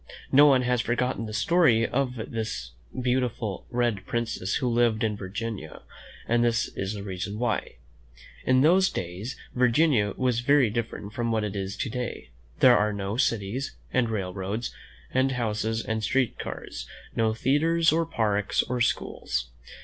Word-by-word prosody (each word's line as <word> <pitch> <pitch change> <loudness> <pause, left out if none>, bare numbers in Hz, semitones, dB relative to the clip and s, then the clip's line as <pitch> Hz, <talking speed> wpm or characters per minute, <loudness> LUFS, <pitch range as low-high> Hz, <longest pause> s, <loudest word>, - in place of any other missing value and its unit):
No 145 +2 +8
one 130 -3 +5
has 125 -1 +1
forgotten 120 0 -1
the - - -6
story 115 - +3
of 130 -1 -1
the 110 -1 -4 0.5
beautiful 125 -5 -1
red 120 -5 0
prin 120 0 0
cess 100 -4 -3
who 130 - 0
lived 120 -2 +2
in 110 -2 +1
Virginia, 100 -3 -6 0.4
and 120 0 +3
this 115 -1 +1
is 100 +2 -3
the 100 - -6
reason 100 +1 -4
why: 120 -1 -1 0.7
In 130 0 +4
those 185 +6 +5
days 95 +9 -5 0.2
Virginia 125 -3 +3
was 125 -2 +1
very 130 -2 +4
different 110 -2 -4
from 115 0 -1
what 110 -1 +1
it 105 -1 -3
is 100 0 -4
to - - -2
day. 125 - -5 0.3
There 125 -1 +8
were 105 0 +2
no 100 0 -3
cities, 115 +1 -1 0.2
and 125 -3 +2
rail 95 -5 -2
roads, 100 +5 -3 0.4
and 130 +1 +2
houses, 110 -1 -1
and 110 -1 -2
street 130 +3 +1
cars; - - -6 0.3
no 110 -1 +1
theatres, 160 +7 +3
or 165 +1 +1
parks, 105 -7 +1
or 125 0 -3
schools. - - -1
115 Hz, 160 wpm, -26 LUFS, 105-125 Hz, 0.7 s, No